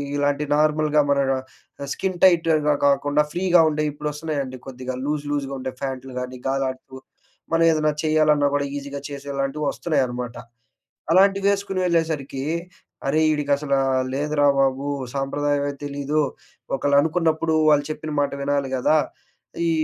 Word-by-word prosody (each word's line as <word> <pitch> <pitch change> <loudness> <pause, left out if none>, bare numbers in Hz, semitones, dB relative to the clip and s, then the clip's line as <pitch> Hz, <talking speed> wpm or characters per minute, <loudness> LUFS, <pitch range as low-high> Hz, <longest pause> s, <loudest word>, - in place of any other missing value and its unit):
ఇలాంటి 145 +1 0
నార్మల్‍గా 150 0 +3
మన 140 0 +3
డ 130 +1 -7
స్కిన్ 185 -2 -3
టైట్‌గా 165 -4 +4
గాకుండా 145 +1 +3
ఫ్రీగా 175 -1 +4
ఉండేయి 150 0 0
ఇప్పుడొస్తున్నాయండి 150 -3 -4
కొద్దిగా 130 0 -5
లూజ్, 150 0 -2
లూజ్‌గా 140 -2 -2
ఉండే 130 0 -5
ఫ్యాన్టులు 130 -1 -5
గానీ 125 0 -7
గాలాడుతూ 130 -1 -3 0.6
మనం 165 0 +4
ఏదన్నా 155 -1 +2
చేయాలన్నా 155 -2 +3
కూడా 140 0 0
ఈజీగా 140 0 -6
చేసేలాంటివి 140 +1 -4
వస్తున్నాయన్నమాట. 125 -6 -2 0.8
అలాంటివేసుకొని 195 +1 +3
వెళ్ళేసరికి 160 -6 -1 0.6
అరేయ్ 155 +3 +3
ఈడిక 145 -1 -2
అసల 140 -1 -1 0.4
లేదురా 145 +1 +1
బాబు. 135 +1 +1 0.3
సాంప్రదాయమే 145 +1 0
తెలీదు. 145 +2 -1 0.5
ఒకళ్ళు 140 +1 +2
అనుకున్నప్పుడు 160 0 +1
వాళ్ళు 145 -1 +4
చెప్పిన 155 0 -6
మాట 145 - 0
వినాలి 140 -1 0
గదా! 130 +5 +3 0.7
ఈ - - +2
145 Hz, 125 wpm, -23 LUFS, 135-155 Hz, 0.8 s, టైట్‌గా